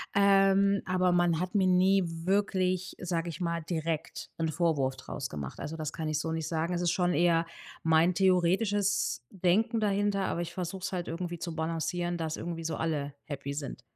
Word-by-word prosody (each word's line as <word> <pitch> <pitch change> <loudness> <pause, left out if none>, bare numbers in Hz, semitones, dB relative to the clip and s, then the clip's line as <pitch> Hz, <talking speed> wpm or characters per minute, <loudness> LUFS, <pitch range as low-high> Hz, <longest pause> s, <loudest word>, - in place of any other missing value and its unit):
ähm, 200 0 +4
aber 185 0 +2
man 175 -2 +3
hat 180 +1 -3
mir 195 -3 +3
nie 185 +1 +4 0.2
wirklich, 185 -2 +1
sage 175 -1 -2
ich 165 - -7
mal, 170 -1 -1
direkt 160 -1 -3
'n 160 -1 +1
Vorwurf 155 -5 +1
draus 130 0 -6
gemacht. 70 -3 -6
Also, 160 +2 -5
das 155 -1 -4
kann 160 - -4
ich 155 -1 0
so 160 +2 -2
nicht 160 -1 -2
sagen. 165 +2 -1
Es 175 - -1
ist 175 - +2
schon 180 -1 +1
eher 170 +1 +3 0.4
mein 160 +2 +4
theoretisches 190 - +2
Denken 200 +5 +1
dahinter, 205 -1 +1
aber 170 - -1
ich 175 - -4
versuche 185 +1 -5
es 195 - -3
halt 180 -2 -3
irgendwie 175 +1 -4
zu 170 -1 -5
balancieren, 170 +2 -2
dass 160 -2 -3
irgendwie 165 -1 -5
so 160 - -2
alle 145 -3 -2
happy 140 -1 -4
sind. 140 -4 -6
175 Hz, 190 wpm, -30 LUFS, 160-190 Hz, 0.4 s, ähm